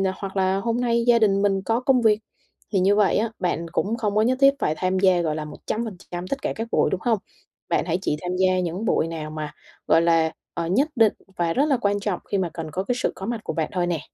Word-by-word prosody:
hoặc 195 0 -6
là 190 0 +2
"Hôm 230 +4 -1
nay 235 -1 +1
gia 235 -1 +6
đình 200 -2 +3
mình 195 -1 +2
có 225 +4 0
công 255 0 +3
việc." 215 -2 +4 0.5
Thì 195 - +3
như 195 +2 +4
vậy 205 -1 +3
á, 225 +2 +1
bạn 170 -2 -1
cũng 215 +6 -1
không 210 -3 -1
có 215 - +4
nhất 255 +3 +2
thiết 275 0 +8
phải 155 - 0
tham 185 0 0
gia, 185 -2 +4
gọi 155 -2 -1
là, 155 -1 -4
100% 185 -1 -5
tất 275 +5 -3
cả - - -2
các 225 +1 -4
buổi, - - +3
đúng 190 - -1
hông? 230 -3 +2 0.5
Bạn - - +1
hãy 170 0 0
chỉ 150 -5 -1
tham 180 0 -3
gia 185 0 +2
những 180 +5 -3
buổi 160 - +2
nào 160 -2 -5
mà, 155 -1 -5 0.4
gọi 165 - +5
là, 165 -1 +3 0.2
ờ, 170 -1 -3
nhất 265 - +2
định 225 -3 +4 0.2
và 170 -1 +1
rất 280 - +2
là 280 -4 +2
quan 205 -2 0
trọng 200 -3 -2
khi 200 - +2
mà 185 -3 0
cần 160 -2 -6
có 185 +5 -2
cái 245 +4 -1
sự - - +2
có 190 - -7
mặt 230 +1 -2
của - - -3
bạn 160 -3 -1
thôi 180 -2 0
nè. 170 -3 -1
195 Hz, 265 wpm, -24 LUFS, 175-225 Hz, 0.5 s, thiết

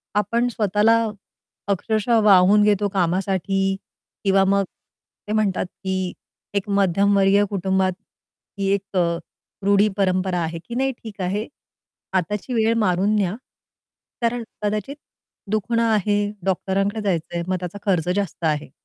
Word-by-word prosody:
आपण 230 +4 +1
स्वतःला 210 0 +3 0.7
अक्षरशः 215 +4 +1
वाहून 205 0 +6
घेतो 205 -1 +3
कामासाठी. 195 +1 0 0.5
किंवा 195 -1 +4
मग 200 +1 +3 0.6
ते - - -4
म्हणतात, 210 -4 +1
की 185 0 -4 0.4
एक 200 0 -2
मध्यमवर्गीय 200 +1 +3
कुटुंबात 190 -1 +1 0.7
ही 195 - 0
एक 200 0 -4
अ, 170 -1 +2 0.5
रूढी-परंपरा 195 -2 +2
आहे, 165 0 -3
की 235 - -7
नाही 270 +2 +1
ठीक 210 -3 -8
आहे. 200 +5 -1 0.7
आताची 210 +7 -2
वेळ 225 -1 +3
मारून 200 0 +2
न्या. 195 -2 0 0.9
कारण 235 0 0 0.2
कदाचित 210 +6 -2 0.6
दुखणं 230 +2 +1
आहे, 210 -2 +2 0.3
डॉक्टरांकडे 195 +3 0
जायचंय, 170 -3 -2
मग 185 - 0
त्याचा 180 +2 -6
खर्च 180 -4 +1
जास्त 200 -4 -3
आहे. 150 -1 0
200 Hz, 120 wpm, -22 LUFS, 185-210 Hz, 0.9 s, वाहून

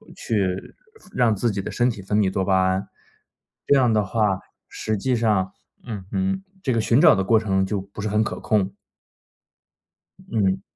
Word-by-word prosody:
去 95 -4 -2 0.4
让 120 -3 +3
自 115 +4 0
己 100 -1 -3
的 - - -6
身 120 +1 +2
体 105 -5 -5
分 100 +2 -1
泌 100 -3 +2
多 95 - -1
巴 95 -1 +3
胺。 95 +1 -1 0.8
这 145 - +4
样 125 -4 +4
的 105 -1 +2
话， 100 -2 +1 0.3
实 110 - -3
际 125 +6 -1
上 105 -5 +1 0.3
嗯 105 -6 -7
哼， 190 0 -1 0.2
这 130 - 0
个 115 - +1
寻 115 +5 +3
找 - - +8
的 95 - 0
过 110 +4 +4
程 95 -3 +1
就 100 0 -2
不 100 +2 -10
是 105 - -2
很 105 +1 +2
可 - - -4
控。 100 -2 0 1.4
嗯。 95 -4 0
105 Hz, 195 characters per minute, -23 LUFS, 95-115 Hz, 1.4 s, 找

